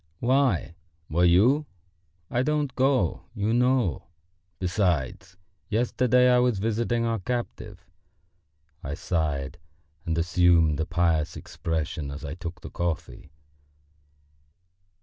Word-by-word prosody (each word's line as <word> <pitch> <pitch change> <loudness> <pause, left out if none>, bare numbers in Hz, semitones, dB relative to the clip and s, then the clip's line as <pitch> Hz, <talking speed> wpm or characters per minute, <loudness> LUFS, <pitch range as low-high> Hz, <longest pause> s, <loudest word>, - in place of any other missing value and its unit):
"Why, 125 - +1 0.4
were 85 +3 +3
you? 120 - +4 0.6
I 120 - +1
don't 150 -1 0
go, 130 0 +1
you 105 +1 0
know. 125 - +1 0.5
Besides, 90 -1 -1 0.3
yesterday 125 +2 +3
I 125 0 +5
was 125 -3 +2
visiting 115 +3 0
our 115 -1 0
captive...." 110 -3 -5 1.0
I 70 +1 -4
sighed 75 -5 -2 0.4
and 80 -1 -2
assumed 85 -3 +3
a 80 - -1
pious 85 -2 0
expression 80 -2 -4
as 75 +3 -7
I 70 - -5
took 85 0 -7
the - - -9
coffee. 85 -2 -4
95 Hz, 110 wpm, -26 LUFS, 80-120 Hz, 1.0 s, I